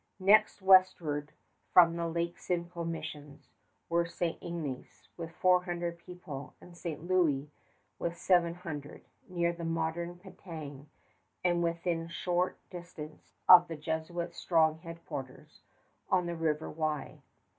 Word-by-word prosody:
Next 200 +1 +4
westward 175 -6 +4 0.4
from 170 -2 +7
the 170 0 -1
Lake 170 +1 -2
Simcoe 170 -1 -3
missions 150 -3 -7 0.4
were 170 0 +1
St. 170 -1 -3
Ignace 155 -7 -6
with 165 -2 -6
four 180 +1 +3
hundred 175 -1 -3
people 170 -6 -9
and 175 - -14
St. 165 -3 -5
Louis 155 -6 +2 0.5
with 170 0 -2
seven 170 -2 +3
hundred, 150 -5 -7 0.2
near 170 -1 +1
the 170 0 -8
modern 165 +1 -2
Penetang 155 -6 -9 0.5
and 175 -1 +2
within 170 0 -1
short 175 +2 -1
distance 170 -4 -10
of 180 -1 +10
the 165 - -6
Jesuits' 160 +3 -3
strong 160 -2 +3
headquarters 165 -6 -8 0.5
on 180 -2 +3
the 170 0 -3
River 160 -1 -1
Wye. 155 -2 -3
170 Hz, 125 wpm, -31 LUFS, 160-175 Hz, 0.5 s, of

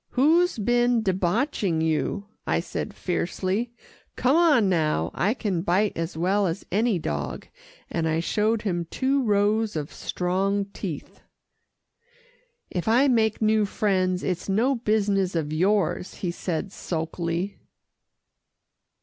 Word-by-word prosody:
"Who's 325 +6 +3
been 240 +1 +2
debauching 190 - 0
you?" 160 +5 0 0.2
I - - +2
said - - -4
fiercely. 185 +5 -2 0.4
"Come 260 +3 +2
on 300 - +5
now 155 - +1
I 210 +6 +1
can 195 -9 -1
bite 195 +4 +1
as 165 0 -4
well 190 +4 +2
as 170 +4 -4
any 215 +1 +2
dog," 165 - -4 0.4
and 165 -1 -1
I 160 0 +1
showed 215 +5 0
him 175 -5 -1
two 275 +1 +1
rows 210 -1 +1
of 150 -2 -4
strong 195 +3 -1
teeth. 170 -8 -6 1.5
"If 180 +1 -3
I 250 +5 +4
make 220 -3 +2
new 215 0 +3
friends, 185 -3 0
it's 180 +1 -2
no 230 +8 +2
business 205 -6 +1
of 155 -2 -1
yours," 185 0 +1
he 180 - -3
said 175 +2 -3
sulkily. 170 +2 -3
195 Hz, 125 wpm, -25 LUFS, 175-220 Hz, 1.5 s, on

